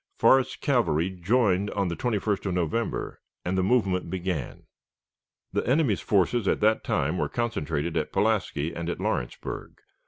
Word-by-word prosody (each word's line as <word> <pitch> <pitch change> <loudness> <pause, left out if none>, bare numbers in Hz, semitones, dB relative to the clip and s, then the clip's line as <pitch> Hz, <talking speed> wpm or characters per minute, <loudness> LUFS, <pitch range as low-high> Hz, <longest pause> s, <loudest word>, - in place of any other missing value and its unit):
Forrest's 130 +3 +4
cavalry 95 - +1
joined 100 +1 +1
on 100 -2 -1
the 85 - -2
21st 105 -3 -1
of 90 - -1
November, 90 +7 -2 0.2
and 90 +2 0
the 95 - +2
movement 95 -4 +1
began. 90 -6 -3 0.9
The - - +1
enemy's 130 - +2
forces 100 +2 +2
at - - +2
that 110 +1 +3
time 80 +6 0
were - - 0
concentrated 85 -9 -2
at 80 -2 -1
Pulaski 75 +4 0
and 85 0 -4
at - - -3
Lawrenceburg. - - -3
95 Hz, 150 wpm, -26 LUFS, 85-115 Hz, 0.9 s, Forrest's